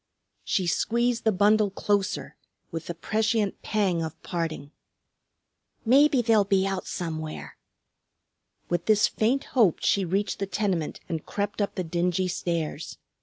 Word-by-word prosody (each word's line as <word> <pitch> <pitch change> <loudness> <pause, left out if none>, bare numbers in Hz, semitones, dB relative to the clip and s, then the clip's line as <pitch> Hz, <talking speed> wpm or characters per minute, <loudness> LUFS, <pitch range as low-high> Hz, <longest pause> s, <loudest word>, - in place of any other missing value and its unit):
She 185 - 0
squeezed 235 +7 0
the 220 - +5
bundle 210 +1 +3
closer 200 0 -1 0.4
with 165 0 -5
the 170 - -4
prescient 215 +3 0
pang 195 -6 0
of 160 -1 -5
parting. 160 -5 -4 1.1
"Maybe 270 +1 +5
they'll 220 -2 +4
be 195 -1 +2
out 195 -1 -3
somewhere." 160 -3 -5 1.1
With 175 -1 -2
this 215 0 +5
faint 250 +6 0
hope 220 - +4
she 200 - +3
reached 195 +4 -1
the 195 - -2
tenement 190 -6 -2
and 160 -2 -3
crept 205 +1 -3
up 200 - -1
the 185 - -2
dingy 175 +2 0
stairs. 165 -3 -3
195 Hz, 135 wpm, -26 LUFS, 170-215 Hz, 1.1 s, the